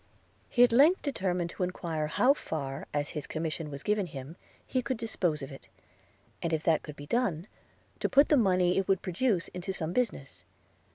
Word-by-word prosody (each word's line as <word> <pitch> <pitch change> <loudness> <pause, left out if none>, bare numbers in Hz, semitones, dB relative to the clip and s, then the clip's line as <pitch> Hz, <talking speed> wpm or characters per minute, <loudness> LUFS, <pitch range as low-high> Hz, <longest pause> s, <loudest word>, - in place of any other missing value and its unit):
He 245 - +5
at 245 - +5
length 290 +10 +5
determined 180 - -1
to - - -8
enquire 170 -4 -2
how 250 - +4
far, 140 - -5
as 145 -1 -1
his 150 -2 -5
commission 160 -1 -3
was 140 -1 -8
given 210 -2 +1
him, 140 +1 -8 0.3
he 255 - 0
could 245 0 -2
dispose 180 -10 -1
of 135 - -7
it; 135 - -12 0.7
and 170 - -1
if 160 -1 0
that 160 -2 +3
could 150 - -9
be 145 - -9
done, 180 -3 0 0.5
to - - 0
put 280 +2 +5
the 300 - +6
money 185 -6 +3
it 195 - -2
would 195 -2 +2
produce 185 0 0
into 180 +2 -5
some 170 -3 -3
business. 140 - -2
180 Hz, 190 wpm, -30 LUFS, 155-230 Hz, 0.7 s, the